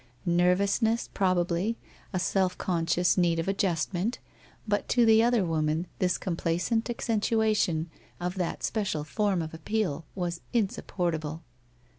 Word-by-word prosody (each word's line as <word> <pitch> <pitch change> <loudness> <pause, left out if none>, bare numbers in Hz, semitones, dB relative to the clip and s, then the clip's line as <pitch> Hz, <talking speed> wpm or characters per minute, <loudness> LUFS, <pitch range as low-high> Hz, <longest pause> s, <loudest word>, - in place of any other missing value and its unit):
Nervousness, 195 +6 +2
probably, 185 +3 +1 0.3
a 190 - -1
self 185 0 +1
conscious 175 +1 +1
need 170 -2 +3
of 165 - -2
adjustment, 195 +2 0 0.5
but 205 -1 0
to 240 -1 +4
the 220 0 +6
other 235 -4 +3
woman 160 0 0
this 185 -1 +2
complacent 180 +6 -1
accentuation 215 -7 +1 0.3
of 180 0 -2
that 180 -3 -3
special 200 -9 -1
form 195 +1 0
of 155 - -7
appeal 165 -3 -2
was 175 -2 -3
insup 210 -5 0
portable. 160 -3 -2
180 Hz, 125 wpm, -28 LUFS, 170-210 Hz, 0.5 s, the